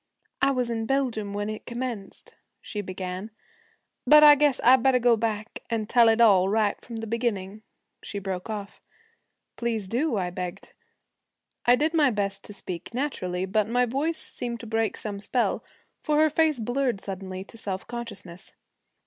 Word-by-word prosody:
'I 275 - +4
was 250 -2 0
in 225 -1 -2
Belgium 245 -6 0
when 205 +1 -3
it 215 0 -6
commenced,' 235 -5 -5 0.3
she 210 - -5
began. 185 +1 -5 0.8
'But 300 0 +8
I 295 -1 +11
guess 290 -2 +2
I 255 +2 +8
better 260 +1 +3
go 240 -1 +4
back 220 -1 -3
and 225 -2 -1
tell 235 -1 +5
it 225 +1 +3
all 195 -5 +6
right 210 -1 +1
from 235 - -8
the 225 0 -4
beginning,' 215 -3 -2 0.4
she 205 - -6
broke 190 0 -4
off. 205 -2 -6 0.8
'Please 225 -4 -2
do,' 245 +4 0
I 180 -2 -1
begged. 180 +1 -6 0.9
I 245 - +7
did 310 +5 +1
my 300 -4 +4
best 200 -3 -2
to - - -10
speak 185 +2 -7
naturally, 185 -10 -2
but 210 +2 0
my 245 +1 +3
voice 285 +7 -1
seemed 240 -1 -4
to - - -9
break 225 -1 -1
some 205 -2 -5
spell, 240 +4 0 0.4
for 300 -1 +1
her 310 0 +4
face 310 -3 +2
blurred 245 0 -1
suddenly 190 -1 -6
to 200 - -15
self 195 -4 -5
consciousness. 210 -7 -8
225 Hz, 170 wpm, -26 LUFS, 200-250 Hz, 0.9 s, I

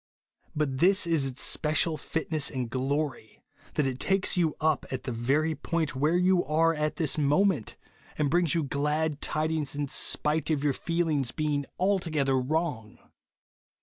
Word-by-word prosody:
But 140 -4 -1
this 190 +3 +4
is 160 -5 +2
its 130 0 -5
special 155 +1 +1
fitness 155 0 -2
and 125 -4 -4
glory, 135 -2 -3 0.3
that 150 - +1
it 130 -1 -3
takes 195 -1 +2
you 170 -4 +1
up 155 -2 +1
at 130 - -4
the 130 - -4
very 140 +7 0
point 155 0 -2
where 150 +6 +2
you 180 0 +3
are 165 +2 +2
at 150 -1 -2
this 160 -3 +1
mo 150 +7 +3
ment, 160 - -1 0.4
and 150 - +1
brings 170 -2 +2
you 165 - +1
glad 150 +2 -1
tidings 155 -2 -1
in 145 0 -2
spite 155 +4 0
of 150 -3 0
your 145 -2 +2
feelings 160 -5 -1
being 145 -1 -2
altogether 165 -8 +1
wrong. 130 -6 -2
150 Hz, 160 wpm, -28 LUFS, 140-165 Hz, 0.4 s, this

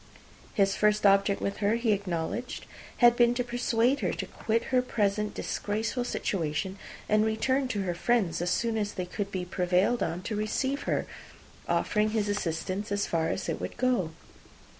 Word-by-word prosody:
His 195 -1 +3
first 210 0 +2
object 200 0 +4
with 200 - -2
her, 210 +1 +2
he 230 -1 +1
acknowledged, 200 +4 -2 0.4
had 240 0 +7
been 240 0 +4
to 245 - 0
persuade 245 +2 +1
her - - 0
to - - -4
quit 230 +1 -1
her 255 - +5
present 210 -3 0
disgraceful 220 +4 -2
situation, 190 -2 -2 0.3
and 215 0 +4
return 255 +5 +1
to 205 -6 -2
her 180 -2 -1
friends 185 -4 +1
as 175 - 0
soon 225 +3 0
as 205 -1 -2
they 180 - -3
could 200 +2 -4
be 185 -2 -3
prevailed 180 +6 +1
on 175 +2 -2
to 215 - -3
receive 265 +6 -1
her, - - +1 0.6
offering 210 0 +1
his 210 -1 +1
assistance 195 +1 -2
as 200 0 +1
far 165 -1 0
as 190 - -2
it - - -2
would - - -5
go. 245 -9 +1
210 Hz, 175 wpm, -28 LUFS, 190-235 Hz, 0.6 s, had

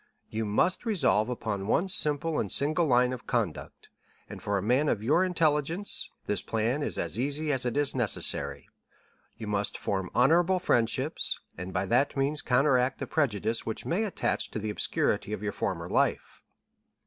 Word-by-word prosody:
You 110 0 -2
must 110 - +1
resolve 130 - +2
upon 105 -5 -3
one 175 - +2
simple 155 -3 +1
and 100 - -2
single 155 +4 +3
line 125 -1 +3
of 125 - -9
conduct, 110 -10 -3 0.4
and - - -9
for 100 0 -1
a - - -1
man 130 +7 +2
of 105 - -1
your 150 +10 +3
intelligence, 165 +1 0 0.2
this 105 - 0
plan 115 +6 -1
is - - -2
as - - -3
easy 145 +4 0
as 130 -2 0
it 120 - -2
is 145 -1 +2
necessary; 120 -5 0 0.7
you 110 - -7
must 105 -1 -1
form 95 -2 -2
honorable 170 +9 +4
friendships, 130 -2 0 0.2
and 90 +2 -6
by 90 +1 -1
that 125 +7 +1
means 140 +2 0
counteract 130 0 +2
the - - -4
prejudice 115 -7 0
which 110 - -4
may 185 +6 0
attach 210 - -1
to - - -6
the 110 0 -3
obscurity 105 0 0
of 105 -1 -5
your 105 -1 -2
former 85 -3 -3
life." - - -1
125 Hz, 170 wpm, -28 LUFS, 105-150 Hz, 0.7 s, honorable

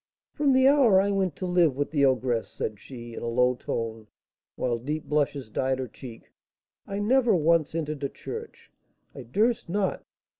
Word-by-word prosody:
"From 290 -2 +2
the 260 0 +5
hour 265 -9 +5
I 200 +1 +1
went 190 -3 0
to 185 - -5
live 175 -6 +3
with 145 - -2
the 145 -3 +3
ogress," 125 -3 +1
said 105 -2 -5
she, 120 -1 -10
in - - -7
a - - -4
low 125 +2 +3
tone, 115 -3 -5 0.5
while 120 -2 -1
deep 150 +5 -3
blushes 145 -3 -1
dyed 130 +3 0
her 130 -1 -4
cheek, 120 -1 -12 0.6
"I 200 - -4
never 235 +1 +3
once 165 -1 +2
entered 155 -3 -3
a 140 - 0
church, 450 0 -9 0.4
I 135 - -8
durst 210 - 0
not. 195 +2 -1
150 Hz, 180 wpm, -26 LUFS, 125-195 Hz, 0.6 s, the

